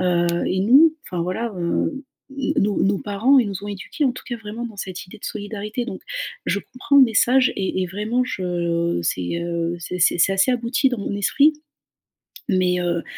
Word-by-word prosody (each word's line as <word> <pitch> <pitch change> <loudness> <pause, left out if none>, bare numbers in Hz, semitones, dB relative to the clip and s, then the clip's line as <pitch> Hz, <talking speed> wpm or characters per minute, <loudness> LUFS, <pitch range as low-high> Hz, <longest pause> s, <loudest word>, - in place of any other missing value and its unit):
Heu, 175 -1 +2 0.2
et 185 - 0
nous, 285 +10 +6
enfin, 180 -2 -4
voilà, 210 +6 -3
heu, 170 - 0
n 270 - -8 0.6
nos 205 0 +1
nos 195 0 +2
parents, 220 +9 +3
ils 245 - +3
nous 195 0 -6
ont - - -5
éduqués, 205 +9 -4
en 260 - +2
tout 255 - -10
cas, 240 - -3
vraiment 225 +2 -6
dans 220 -3 -11
cette 185 -1 -6
idée - - -12
de - - -12
solidarité, 210 +2 -4
donc - - -7 0.4
je - - 0
comprends 255 +5 -1
le 270 - +9
message 255 +3 +3
et 190 -1 -1
et - - -1
vraiment, 210 +7 -1
je 170 - -1
c'est, 90 - -2
heu, 170 0 -2
c'est 180 +2 -5
c'est 175 0 +3
c'est 185 +3 +4
assez 195 +6 +3
abouti 245 +2 +1
dans 245 - -2
mon 200 0 -3
esprit, 285 +9 +3 1.0
mais 185 -2 +2
heu, 170 -1 -1
200 Hz, 200 wpm, -22 LUFS, 180-240 Hz, 1.0 s, le